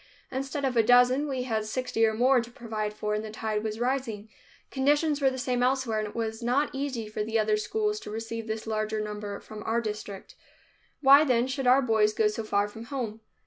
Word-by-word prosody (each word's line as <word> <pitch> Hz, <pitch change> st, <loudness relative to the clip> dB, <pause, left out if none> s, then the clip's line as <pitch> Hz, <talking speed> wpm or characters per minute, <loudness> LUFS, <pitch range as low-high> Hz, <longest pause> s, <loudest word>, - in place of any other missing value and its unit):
Instead 270 Hz, +2 st, -3 dB
of 260 Hz, -2 st, -1 dB
a 230 Hz, -, +6 dB
dozen, 245 Hz, +5 st, +4 dB
we 260 Hz, -3 st, -2 dB
had 220 Hz, -4 st, -1 dB
sixty 225 Hz, +1 st, -1 dB
or 220 Hz, -, 0 dB
more 250 Hz, +2 st, +4 dB
to 235 Hz, -, -9 dB
provide 220 Hz, -4 st, -4 dB
for 210 Hz, 0 st, -3 dB
and 210 Hz, 0 st, -1 dB
the 220 Hz, -, -6 dB
tide 215 Hz, 0 st, -3 dB
was 215 Hz, 0 st, -3 dB
rising. 240 Hz, -4 st, -2 dB, 0.4 s
Conditions 290 Hz, +2 st, +2 dB
were 270 Hz, -, +5 dB
the 260 Hz, -, -5 dB
same 250 Hz, -1 st, -1 dB
elsewhere 250 Hz, -3 st, +1 dB
and 215 Hz, -, -2 dB
it 210 Hz, -, -11 dB
was 225 Hz, 0 st, -3 dB
not 255 Hz, +5 st, +1 dB
easy 265 Hz, -5 st, -3 dB
for 210 Hz, 0 st, -3 dB
the 225 Hz, +1 st, -1 dB
other 215 Hz, -1 st, +2 dB
schools 420 Hz, -, -1 dB
to -, -, -9 dB
receive 225 Hz, +1 st, -5 dB
this 220 Hz, 0 st, -4 dB
larger 215 Hz, 0 st, -2 dB
number 210 Hz, -1 st, -5 dB
from 215 Hz, -1 st, -10 dB
our 225 Hz, +2 st, 0 dB
district. 210 Hz, -3 st, -6 dB, 0.7 s
Why, 280 Hz, +1 st, +8 dB
then, 250 Hz, -4 st, +2 dB
should 260 Hz, 0 st, -2 dB
our 260 Hz, +2 st, +6 dB
boys 220 Hz, -3 st, +3 dB
go 215 Hz, -1 st, +3 dB
so 215 Hz, +1 st, -4 dB
far 205 Hz, -1 st, +1 dB
from 225 Hz, +2 st, -10 dB
home? 230 Hz, -5 st, -4 dB
230 Hz, 220 wpm, -28 LUFS, 215-260 Hz, 0.7 s, Why